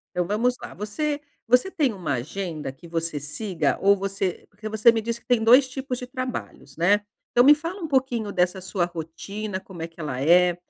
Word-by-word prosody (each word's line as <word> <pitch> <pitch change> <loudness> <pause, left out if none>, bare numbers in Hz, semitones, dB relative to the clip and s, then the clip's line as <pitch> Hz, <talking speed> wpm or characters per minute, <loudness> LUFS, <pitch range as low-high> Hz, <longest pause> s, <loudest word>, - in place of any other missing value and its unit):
Então 180 -1 +1
vamos 235 +5 +1
lá, - - -8
você 290 +8 -2 0.3
você 250 +10 +4
tem 280 -7 +1
uma 175 -8 -3
agenda 155 +3 -4
que 170 +6 -15
você 165 -2 -2
siga 175 +6 -1
ou 200 +1 +6
você 195 -2 -3
porque 215 +1 -8
você 220 +2 +5
me 225 -1 -1
disse 235 +1 -3
que - - -33
tem 240 -3 +3
2 255 +4 +7
tipos 260 -1 -4
de 250 - -6
trabalhos, 255 - -6
né, 200 +5 +4 0.3
então 245 - +5
me 295 +2 +8
fala 335 +5 -6
um 325 - -3
pouquinho 255 -6 0
dessa 180 0 +1
sua 185 -1 -1
rotina, 185 +5 -5
como 185 -4 -11
é 165 - -3
que 165 - -23
ela 135 -5 -3
é, 175 +4 +5
205 Hz, 210 wpm, -25 LUFS, 175-245 Hz, 0.3 s, me